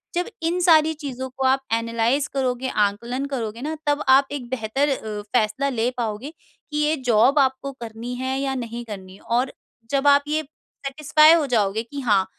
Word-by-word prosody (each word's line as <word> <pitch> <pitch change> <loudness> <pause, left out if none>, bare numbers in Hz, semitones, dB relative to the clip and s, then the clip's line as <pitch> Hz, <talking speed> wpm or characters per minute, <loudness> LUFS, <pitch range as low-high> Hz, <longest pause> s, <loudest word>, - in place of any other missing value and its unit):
जब 355 +1 0 0.2
इंसान 340 +2 0 0.2
सारी 315 +1 +3
चीज़ 280 -5 -7 0.2
को 265 - 0
आप 270 +1 +3
एनालाइज़ 230 +5 +1
करोगे, 260 -1 -1
आँकलन 235 +6 -1
करोगे 235 -4 -4
ना 310 +2 -3
तब 290 0 +1
आप 270 +1 +6
एक 260 -4 -5
बेहतर 260 +4 0
अ, 215 -6 -3
फैसला 245 +4 +1
ले 240 -2 0
पाओगे 230 +5 -3 0.4
कि 300 - -2
ये 300 +1 +2
जॉब 240 +7 +5
आपको 265 0 +1
करनी 230 +1 -6
है 260 +1 -2
या 270 -1 -1
नहीं 240 -1 -5
करनी 190 -4 -9
है, - - -17
और 245 +3 0 0.4
जब 280 0 +1
आप 285 0 +6
ये 305 +1 0
सैटिस्फाई 305 +1 +2
हो 330 -3 +3
जाओगे 210 +1 +1
कि 280 +4 -8
हाँ, 205 -6 +3
260 Hz, 185 wpm, -23 LUFS, 230-285 Hz, 0.4 s, आप